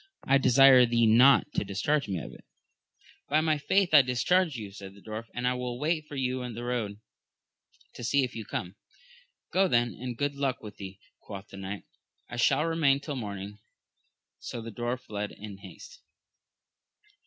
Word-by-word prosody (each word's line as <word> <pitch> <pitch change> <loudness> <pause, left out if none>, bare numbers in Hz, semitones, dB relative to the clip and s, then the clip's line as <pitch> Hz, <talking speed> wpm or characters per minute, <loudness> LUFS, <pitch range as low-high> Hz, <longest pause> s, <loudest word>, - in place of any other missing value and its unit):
I 135 0 +4
desire 130 -1 +7
thee 115 0 +3
not 130 +6 +5
to - - 0
discharge 125 +9 -1
me 95 -2 -2
of 80 - -7
it. - - -15 0.9
By 150 - +3
my 155 -2 +1
faith 180 +5 +1
I 150 - +10
discharge 150 +6 +1
you, 105 -4 -6
said 100 -1 -11
the - - -15
dwarf, 110 +2 -7
and 125 0 -1
I 125 - +2
will 125 -1 -4
wait 155 +2 -1
for 150 - -9
you 130 -1 -1
in 125 -2 -6
the 120 - -6
road, 115 -4 -3 0.9
to - - -9
see 140 +4 +2
if 125 - -3
you 115 - -5
come. 95 -1 -5 0.8
Go 190 +1 +4
then, 120 -6 +2
and 125 -1 -6
good 145 0 -1
luck 140 -2 -1
go - - -27
with 105 -1 -10
thee, 95 -1 -9 0.2
quoth 100 -1 -10
the 100 - -11
knight; 95 +1 -6 0.4
I 120 - -8
shall 135 +5 +3
remain 155 -4 +2
till 145 0 -5
morning. 100 -3 -6 0.8
So 120 - -6
the 115 0 -7
dwarf 120 +3 -3
fled 105 -3 -5
in 105 -2 -9
haste. 100 - -13
125 Hz, 190 wpm, -28 LUFS, 105-140 Hz, 0.9 s, I